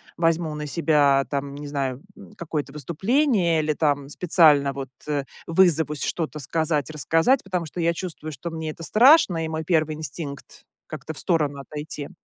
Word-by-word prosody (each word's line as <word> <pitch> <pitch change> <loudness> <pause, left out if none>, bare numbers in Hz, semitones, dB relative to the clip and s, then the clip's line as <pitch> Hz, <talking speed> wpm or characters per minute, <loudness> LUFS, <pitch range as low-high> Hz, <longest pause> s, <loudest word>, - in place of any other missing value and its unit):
возьму 165 -1 0
на 150 0 -5
себя, 145 -3 +3
там 140 0 -3
не 145 +1 -8
знаю, 135 -2 -3
м, - - -14
какое-то 150 -5 -4
выступление 175 - +1
или 155 0 0
там 145 -2 0
специально 150 -5 +4
вот, 135 -2 -6 0.2
э, 145 -2 -1 0.2
вызовусь 160 -4 +2
что-то 160 -2 -3
сказать, 155 0 -1
рассказать, 165 - +2
потому 180 -3 -3
что 160 +3 -8
я 170 0 +2
чувствую, 160 -4 -6
что 155 +4 -7
мне 160 -1 -5
это 165 +2 -8
страшно, 215 - +5
и 160 - -2
мой 160 0 -4
1 155 -2 +1
инстинкт- 150 -1 -7 0.2
как-то 160 - -7
в - - -5
сторону 150 -6 0
отойти. 150 0 -7
155 Hz, 165 wpm, -24 LUFS, 145-170 Hz, 0.2 s, страшно